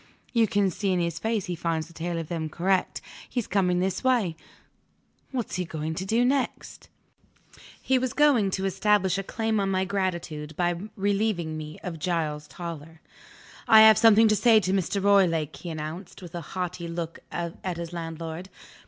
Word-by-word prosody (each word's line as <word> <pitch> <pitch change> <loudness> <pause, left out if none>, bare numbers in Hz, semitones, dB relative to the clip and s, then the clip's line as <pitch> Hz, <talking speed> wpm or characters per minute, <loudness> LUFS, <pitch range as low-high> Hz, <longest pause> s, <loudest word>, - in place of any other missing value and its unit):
You 230 -2 +4
can 200 -1 +1
see 195 +3 -1
in 180 - +1
his 170 -1 -2
face 220 -3 -1
he 180 - -3
finds 165 -1 -2
the 170 - -16
tale 170 +1 -3
of 165 -2 -4
them 160 -2 -3
correct. 185 +4 0 0.3
He's 245 -4 -2
coming 180 -3 +1
this 190 +4 -1
way. 235 -10 +2 0.9
What's 245 -7 -3
he 180 - 0
going 160 -2 -4
to 185 +4 -4
do 230 +4 +3
next?" 270 0 -2 0.9
He 260 -1 +2
was 255 -1 -1
going 275 -9 +4
to 190 - -2
establish 195 0 +2
a - - -3
claim 220 +2 -1
on 195 -1 0
my 190 0 +1
gratitude, 170 -6 -3
by 175 -1 +2 0.2
relieving 200 -5 0
me 155 0 -7
of 170 -3 -5
Giles 155 -3 -2
Toller. 165 -2 -8 0.7
"I 220 0 +9
have 220 -1 +8
something 225 0 +7
to 215 - +3
say 225 0 +5
to 185 -1 -1
Mr. 195 +1 0
Roylake," 165 -7 +3
he 175 - -7
announced, 160 +4 -7
with 175 - -10
a 175 - -4 0.2
haughty 180 -1 -3
look 170 0 -5
at 175 +1 -4
his 170 0 -6
landlord. 165 +1 -6
180 Hz, 180 wpm, -26 LUFS, 165-205 Hz, 0.9 s, I